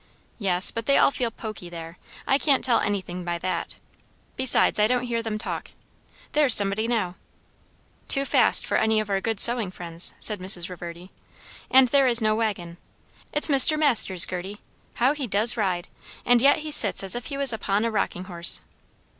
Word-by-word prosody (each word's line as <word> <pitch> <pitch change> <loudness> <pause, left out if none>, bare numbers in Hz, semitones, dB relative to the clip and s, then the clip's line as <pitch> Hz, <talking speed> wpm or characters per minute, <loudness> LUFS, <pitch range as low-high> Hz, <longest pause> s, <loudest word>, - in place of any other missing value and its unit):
"Yes, 185 -3 +1
but 230 0 -7
they 275 - +3
all - - +3
feel 245 -3 -3
poky 215 -6 -9
there. 165 0 -11 0.3
I 270 - +1
can't 280 -3 +1
tell 245 -3 +1
anything 185 -3 -4
by 175 0 -4
that. 185 +2 -5 0.6
Besides, 260 -4 +2
I 210 - +3
don't 250 +1 -1
hear 235 -2 -3
them 220 -2 -5
talk. 215 - -7 0.6
There's 295 -5 +5
somebody 205 +2 +1
now!" 210 -7 -3 0.9
"Too 275 -1 +2
fast - - +3
for - - -1
any 220 0 +1
of 215 -1 -5
our 195 -1 -1
good 225 -2 -3
sewing 235 -4 +2
friends," 170 -2 -6
said 210 -3 -3
Mrs. 185 -2 -2
Reverdy; 175 +1 -10 0.6
"and 260 -1 +4
there 275 0 +2
is 240 -2 +3
no 215 -2 +1
waggon. 200 -6 -4 0.5
It's 295 - +2
Mr. 290 +1 +5
Masters, 230 - +3
Gerty! 185 +3 -7 0.4
How 255 +4 +1
he 285 -4 -5
does 215 +3 +3
ride; 185 -6 -3 0.4
and 245 -1 +3
yet 280 +3 +3
he 305 - -6
sits 215 -9 +6
as 190 - +3
if 240 0 -5
he 280 - -6
was 275 -3 -1
upon 210 0 -2
a 230 - -2
rocking 190 -4 -3
horse." 175 -2 0
215 Hz, 185 wpm, -23 LUFS, 185-245 Hz, 0.9 s, sits